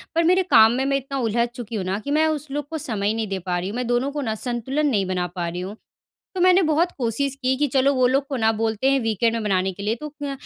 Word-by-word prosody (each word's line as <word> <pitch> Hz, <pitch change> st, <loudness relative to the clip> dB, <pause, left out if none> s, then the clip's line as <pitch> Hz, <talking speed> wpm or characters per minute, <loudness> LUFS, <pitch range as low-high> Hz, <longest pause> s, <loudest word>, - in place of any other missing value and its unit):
पर 335 Hz, -, +3 dB
मेरे 365 Hz, +3 st, +4 dB
काम 220 Hz, 0 st, +7 dB
में 260 Hz, +2 st, -1 dB
मैं 275 Hz, 0 st, +1 dB
इतना 275 Hz, +1 st, -5 dB
उलझ 235 Hz, 0 st, +1 dB
चुकी 235 Hz, -2 st, -6 dB
हूँ 195 Hz, -, -2 dB
ना, 190 Hz, +2 st, -1 dB
कि 285 Hz, +6 st, -5 dB
मैं 315 Hz, +1 st, +3 dB
उस 305 Hz, -1 st, -2 dB
लोग 290 Hz, 0 st, -3 dB
को 320 Hz, -, -4 dB
समय 215 Hz, -8 st, -1 dB
नहीं 225 Hz, -1 st, -2 dB
दे 195 Hz, -1 st, -3 dB
पा 180 Hz, 0 st, -2 dB
रही 185 Hz, +2 st, -4 dB
हूँ। 215 Hz, -, -6 dB
मैं 250 Hz, -1 st, -2 dB
दोनों 245 Hz, +3 st, 0 dB
को 290 Hz, 0 st, -3 dB
ना, 220 Hz, -4 st, -2 dB
संतुलन 260 Hz, +6 st, -2 dB
नहीं 205 Hz, -8 st, +1 dB
बना 180 Hz, -1 st, -2 dB
पा 175 Hz, -1 st, -2 dB
रही 175 Hz, +1 st, -4 dB
हूँ। 195 Hz, +3 st, -6 dB, 0.6 s
तो 360 Hz, -, -1 dB
मैंने 370 Hz, +1 st, +5 dB
बहुत 320 Hz, +3 st, +2 dB
कोशिश 255 Hz, +3 st, 0 dB
की 260 Hz, +1 st, +2 dB
कि, 295 Hz, 0 st, +1 dB
"चलो, 275 Hz, +2 st, +2 dB
वो 255 Hz, -1 st, +4 dB
लोग 270 Hz, +2 st, +1 dB
को 270 Hz, -, -3 dB
ना 220 Hz, -1 st, +3 dB
बोलते 225 Hz, +4 st, 0 dB
हैं, 275 Hz, -, +3 dB
वीकेंड 225 Hz, +1 st, +1 dB
में -, -, -1 dB
मनाने 190 Hz, -2 st, +1 dB
के 200 Hz, -, -9 dB
लिए।" 215 Hz, +2 st, 0 dB
तो 300 Hz, -, -5 dB
क्य 280 Hz, -, -2 dB
245 Hz, 295 wpm, -22 LUFS, 215-280 Hz, 0.6 s, काम